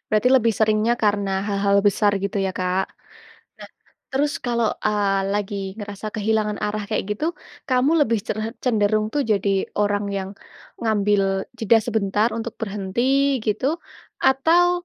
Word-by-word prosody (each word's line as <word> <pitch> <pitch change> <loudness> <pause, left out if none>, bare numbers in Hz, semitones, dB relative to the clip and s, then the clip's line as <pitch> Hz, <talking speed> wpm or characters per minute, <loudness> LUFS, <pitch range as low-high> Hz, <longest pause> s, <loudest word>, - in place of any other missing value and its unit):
Berarti 215 +4 +3
lebih 230 -2 +3
seringnya 215 +1 +3
karena 205 -2 +1 0.2
hal-hal 200 0 +2
besar 205 +1 +3
gitu 200 +1 -2
ya - - -1
Kak. 185 +1 0 0.7
Nah - - -10 0.4
terus 290 +2 +1
kalau, 235 -2 +1 0.2
eee, 200 -2 +1
lagi 205 0 -2 0.2
ngerasa 205 0 -7
kehilangan 215 -1 0
arah 210 0 -2
kayak - - -1
gitu, 305 - -3 0.4
kamu 255 +3 +3
lebih 230 -4 +1
creh 215 +1 -2 0.2
cenderung 215 -3 +2
tuh 290 -1 +1
jadi 200 -1 0 0.3
orang 205 0 +1
yang 190 0 -3 0.5
ngambil 210 -3 +2 0.4
jeda 225 +1 +4
sebentar 210 -1 +1
untuk 230 0 -5
berhenti 200 +1 -3 0.4
gitu 215 +5 0 0.6
atau, 350 +6 +3
215 Hz, 135 wpm, -22 LUFS, 205-230 Hz, 0.7 s, jeda